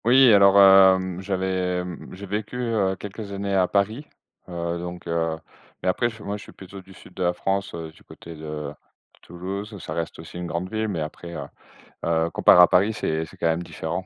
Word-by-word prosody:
Oui, 125 0 +7
alors, 100 -1 +6
hem, 95 -2 +6
j'avais 95 -2 -1 0.3
j'ai 100 +2 -8
vécu, 105 +4 -4
heu, 110 -6 0
quelques 100 +1 -8
années 100 0 -3
à 95 -2 +3
Paris, 110 +10 0 0.4
heu, 85 -1 -3
donc, 90 0 -7
heu, 80 -1 -1 0.5
mais - - +2
après, 120 +6 +1
je 110 -2 -12
moi 100 +1 -3
je - - -12
suis - - -12
plutôt 95 0 -11
du 95 - -18
sud - - -15
de - - -8
la 90 -1 +2
France, 95 +1 -2
heu, 80 -1 -7
du 80 - -21
côté 85 - -12
de 75 -1 -6
de - - -24
Toulouse, 100 +5 -6
ça - - -6
reste 85 -1 -4
aussi 80 +2 -10
une 90 - -4
grande 85 +2 -4
ville 110 0 -1
mais 90 -6 -3
après, 85 +3 -7
heu, - - -5 0.6
heu, 80 0 +1
comparé 90 - +6
à 90 - +9
Paris, 100 +5 +3
c'est 80 -6 -2
c'est - - -16
quand - - 0
même 80 +1 0
différent. 85 +2 -5
95 Hz, 215 wpm, -24 LUFS, 85-100 Hz, 0.6 s, à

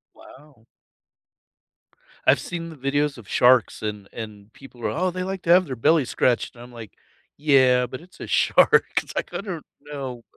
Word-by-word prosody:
Wow. 135 -5 -18 1.6
I've - - +5
seen 170 -1 -6
the 160 - -10
videos 140 +1 -1
of 110 -4 -13
sharks 125 -4 +3
and 105 -2 -5
and 105 -2 -9
people 125 -3 -12
are, - - +1
"Oh, 180 +3 -1
they 185 +1 -4
like 190 0 -4
to 170 - +1
have 180 +1 +6
their 130 - -5
belly 145 +4 +3
scratched," 120 0 0
and 120 - -12
I'm 125 - -13
like, 115 -4 -11 0.4
"Yeah, 130 -4 +4
but 130 +4 -8
it's 180 +1 -19
a - - -7
shark," - - +4 0.2
it's - - -12
like - - -4
I - - -3
don't 180 -6 -7 0.2
know. 135 -5 -7
135 Hz, 185 wpm, -23 LUFS, 120-160 Hz, 1.6 s, have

